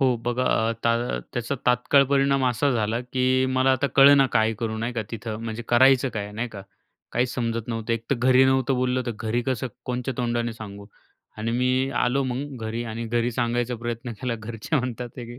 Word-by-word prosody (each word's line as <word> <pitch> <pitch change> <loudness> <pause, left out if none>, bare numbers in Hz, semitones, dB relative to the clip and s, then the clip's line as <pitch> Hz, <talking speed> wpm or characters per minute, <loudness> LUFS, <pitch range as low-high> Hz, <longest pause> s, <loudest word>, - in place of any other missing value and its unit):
हो 130 -3 +3
बघा, 120 +1 0 0.2
आता 115 - 0
त्याचा 120 +3 -2
तात्काळ 125 +3 +4
परिणाम 135 0 +2
असा 125 +3 +1
झाला, 115 -1 0
की 130 +1 +1
मला 130 0 +3
आता 130 +2 +1
कळेना 140 0 +7
काय 110 0 +3
करू 110 -2 -2
नाही 115 +2 -2
का 115 -2 -2
तिथं, 115 -1 -5
म्हणजे 115 +1 -4
करायचं 130 +2 +5
काय 105 -1 -4
नाही 115 +4 -3
का? 100 -3 -9 0.5
काहीच 125 +1 0
समजत 115 -1 -2
नव्हतं. 115 0 -2
एक 115 0 -2
तर - - +4
घरी 130 +2 +5
नव्हतं 130 0 +2
बोललं, 125 0 0
तर 120 - -1
घरी 115 +2 -1
कसं 130 -1 -1 0.2
कोणच्या 125 +1 -3
तोंडाने 120 -1 -1
सांगू. 100 -2 -9 0.5
आणि 110 +2 -2
मी 130 +2 +1
आलो 135 +3 +2
मग 130 +2 -4
घरी 115 +2 -3
आणि 115 +1 -5
घरी 120 +1 0
सांगायचा 120 +1 -1
प्रयत्न 120 +1 -5
केला. 125 -3 -1
घरचे 115 +7 -3
म्हणतात 125 -1 -3
की 120 0 -8
120 Hz, 190 wpm, -24 LUFS, 115-130 Hz, 0.5 s, कळेना